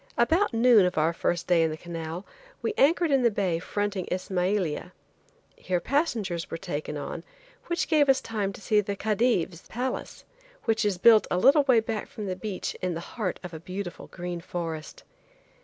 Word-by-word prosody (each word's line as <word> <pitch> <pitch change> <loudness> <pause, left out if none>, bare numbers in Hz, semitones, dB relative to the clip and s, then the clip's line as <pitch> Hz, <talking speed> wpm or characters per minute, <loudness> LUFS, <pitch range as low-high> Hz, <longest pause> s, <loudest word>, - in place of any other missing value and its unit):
About 325 +12 +3
noon 230 -4 +5
of 180 - -4
our 160 +2 +3
first 175 +1 -1
day 175 -2 +4
in 160 - +3
the 155 - -5
canal 165 +1 -6 0.4
we - - 0
anchored 330 +1 +3
in 270 -1 +4
the 240 - +5
bay 190 -6 0
fronting 205 +1 -2
Ismailia. 185 -2 -1 0.6
Here 180 -1 -1
passengers 215 - -1
were 165 - -4
taken 155 -4 -4
on, 165 +3 -5 0.4
which 345 - -1
gave 300 -4 +4
us 265 - +5
time 210 -3 -2
to - - -11
see 210 0 +3
the 200 0 -3
Khedive's 205 -5 0
palace, 250 +3 -4 0.4
which 220 -1 +1
is 200 -3 +1
built 220 +3 +6
a 180 - +1
little 280 +9 +5
way 250 -4 +5
back 220 -1 -4
from 210 - -7
the 185 -2 -2
beach 195 0 -4
in 180 -2 -1
the - - -3
heart 210 -6 -2
of 180 -1 -7
a 160 - -6
beautiful 180 +2 -6
green 175 -1 -5
forest. 165 -3 -5
195 Hz, 185 wpm, -27 LUFS, 175-230 Hz, 0.6 s, built